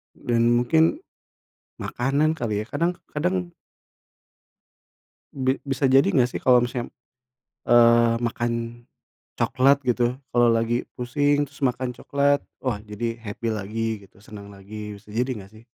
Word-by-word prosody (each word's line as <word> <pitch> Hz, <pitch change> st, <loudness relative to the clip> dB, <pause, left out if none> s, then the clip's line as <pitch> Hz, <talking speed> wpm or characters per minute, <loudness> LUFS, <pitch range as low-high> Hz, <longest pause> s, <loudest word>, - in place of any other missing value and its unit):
Dan 115 Hz, -1 st, +1 dB
mungkin 160 Hz, -, +2 dB, 0.8 s
makanan 145 Hz, +5 st, 0 dB
kali 110 Hz, -6 st, -1 dB
ya, -, -, -6 dB
kadang 170 Hz, +2 st, 0 dB, 0.2 s
kadang 180 Hz, +3 st, -1 dB, 1.8 s
Bi 130 Hz, -2 st, 0 dB
bisa 135 Hz, -1 st, 0 dB
jadi 135 Hz, +2 st, +5 dB
nggak 125 Hz, -5 st, +3 dB
sih, -, -, -5 dB
kalau 125 Hz, -1 st, +6 dB
misalnya, 120 Hz, 0 st, -3 dB, 0.8 s
eee, 120 Hz, -1 st, +5 dB
makan 120 Hz, 0 st, -1 dB, 0.8 s
coklat 135 Hz, +2 st, +3 dB
gitu, 120 Hz, 0 st, +1 dB, 0.2 s
kalo 120 Hz, 0 st, +4 dB
lagi 115 Hz, +1 st, 0 dB
pusing, 145 Hz, +4 st, +1 dB
terus 145 Hz, -, -18 dB
makan 125 Hz, 0 st, -1 dB
coklat, 140 Hz, +1 st, +1 dB, 0.2 s
wah 125 Hz, -6 st, -2 dB
jadi 110 Hz, +2 st, -4 dB
happy 115 Hz, +2 st, -5 dB
lagi 110 Hz, +1 st, -3 dB
gitu, 95 Hz, -, -24 dB
senang 105 Hz, -1 st, -11 dB
lagi. 105 Hz, +1 st, -8 dB
Bisa 100 Hz, +1 st, -17 dB
jadi 125 Hz, +4 st, 0 dB
nggak 100 Hz, -2 st, -11 dB
sih? 110 Hz, +1 st, -16 dB
120 Hz, 135 wpm, -24 LUFS, 115-135 Hz, 1.8 s, kalau